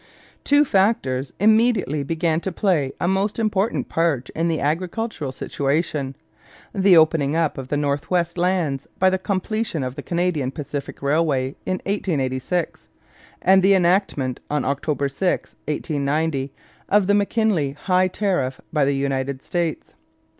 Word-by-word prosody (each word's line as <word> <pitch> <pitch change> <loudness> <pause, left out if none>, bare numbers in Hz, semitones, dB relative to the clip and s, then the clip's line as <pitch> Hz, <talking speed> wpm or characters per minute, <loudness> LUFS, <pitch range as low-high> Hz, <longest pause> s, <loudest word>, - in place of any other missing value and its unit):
Two 290 +1 +4
factors 190 - +1
immediately 215 - +3
began 160 +2 0
to 190 - -3
play 170 -8 +1
a - - 0
most 195 +3 0
important 215 -1 0
part 160 -7 0
in 165 +1 -1
the 165 -2 0
agricultural 170 - -2
situation: 140 0 -2 0.6
the 190 -2 +5
opening 155 -2 +3
up 165 -2 +1
of 135 -1 -6
the 145 - -1
north 145 -1 -1
western 175 -1 0
lands 170 -7 0
by 190 0 +4
the 190 - 0
completion 200 - -2
of 125 -1 -3
the 145 - -7
Canadian 170 -5 -1
Pacific 140 0 -6
Railway 140 -2 +1
in 185 - +1
1886, 160 -4 -2 0.6
and 190 +1 +6
the 195 +1 +5
enactment, 175 -8 +1
on 150 -2 -1
October 140 +1 -1
6, 180 +7 -1 0.2
1890, 145 -1 -1 0.4
of 205 -1 +4
the 200 - +3
McKinley 205 -8 +1
high 185 +5 +1
tariff 180 -10 -1
by 150 -3 +3
the 140 0 +1
United 135 0 -2
States. 170 -3 -3
165 Hz, 140 wpm, -22 LUFS, 140-190 Hz, 0.6 s, and